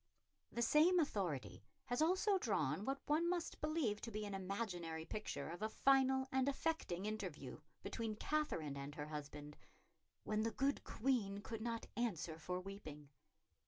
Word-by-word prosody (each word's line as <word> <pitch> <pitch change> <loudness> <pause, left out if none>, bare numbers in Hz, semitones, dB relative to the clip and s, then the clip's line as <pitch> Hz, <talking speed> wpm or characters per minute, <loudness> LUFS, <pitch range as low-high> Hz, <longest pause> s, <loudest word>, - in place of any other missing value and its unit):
The 235 - +1
same 325 +8 +6
authority 190 - -1 0.2
has 245 +4 0
also 375 +4 +4
drawn 190 - +1
what 270 +1 -1
one 320 +3 +3
must 350 -2 -1
believe 300 -9 +1
to 230 - -4
be 215 -1 -3
an 205 - -4
imaginary 185 -5 -2
picture 215 +4 -3
of 175 +3 -6
a 215 - +1
final 265 +1 +4
and 265 +1 +3
affecting 275 - -1
interview 185 -10 -4 0.2
between 225 -2 -2
Katherine 210 - 0
and 140 +1 -5
her 150 0 -4
husband, 150 0 -6 0.7
"when 215 0 +1
the 225 - +2
good 275 +4 +1
Queen 220 -5 +1
could 225 +1 -5
not 230 0 -2
answer 175 -9 -1
for 180 +2 -2
weeping." 155 -7 -8
215 Hz, 155 wpm, -40 LUFS, 170-270 Hz, 0.7 s, same